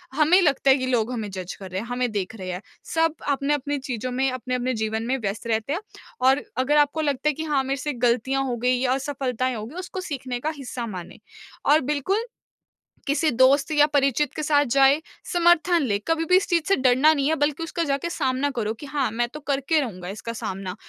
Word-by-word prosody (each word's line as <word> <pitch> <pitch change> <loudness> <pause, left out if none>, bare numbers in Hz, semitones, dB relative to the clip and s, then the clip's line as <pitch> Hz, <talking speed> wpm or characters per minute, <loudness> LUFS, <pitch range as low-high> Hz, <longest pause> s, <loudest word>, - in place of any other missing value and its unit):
हमें 315 +5 +5
लगता 275 -4 +2
है 265 - +5
कि 255 -1 -2
लोग 240 -1 +1
हमें 220 -4 -4
जज 185 -1 -6
कर 190 -2 -10
रहे 190 +2 -2
हैं, 230 - -8
हमें 245 -1 -1
देख 205 +1 -3
रहे 185 -3 -6
हैं। 180 +2 -5 0.3
सब 325 -1 +2
अपने-अपने 285 0 0
चीज़ों 255 -2 -4
में, 265 +2 +1
अपने-अपने 255 0 -2
जीवन 220 0 -2
में 265 +1 +1
व्यस्त 210 +2 -4
रहते 225 +5 0
हैं 365 - -2 0.4
और 265 +2 +4
अगर 275 +3 +2
आपको 295 +2 +3
लगता 285 -1 0
है - - +1
कि, 320 - -5
"हाँ, 290 -4 +1
मेरे 270 +1 -2
से 295 0 -2
गलतियाँ 260 +3 +1
हो 245 -2 -1
गईं 250 +1 +1
या 255 -1 +2
असफलताएँ 260 -2 -2
हो 215 - -5
गईं।" 275 +10 -10
उसको 370 +1 -5
सीखने 255 -3 -4
का 305 +5 -2
हिस्सा 250 -3 -5
मानें 180 -5 -8 0.5
और 310 - +6
बिल्कुल 385 - 0 0.8
किसी 305 +3 +2
दोस्त 270 +5 +4
या 295 -1 +5
परिचित 285 -1 +1
के 305 - -3
साथ 290 -1 +3
जाएँ, 275 +2 +5 0.2
समर्थन 345 -1 +3
लें। 205 -5 0
कभी 325 0 +1
भी 365 +3 +5
इस 390 - 0
चीज़ 335 -2 +2
से 390 - +4
डरना 260 +4 +4
नहीं 280 -2 0
है, 320 - +2
बल्कि 290 +2 0
उसका 335 +1 -2
जाके 280 +3 -1
सामना 275 -3 0
करो 220 -1 -1
कि, 260 +6 -11
"हाँ, 275 -3 -1
मैं 240 +1 0
तो 300 - -6
करके 285 +2 0
रहूँगा 185 -10 -4
इसका 225 +3 -6
सामना।" 190 -4 -5
270 Hz, 220 wpm, -24 LUFS, 240-295 Hz, 0.8 s, और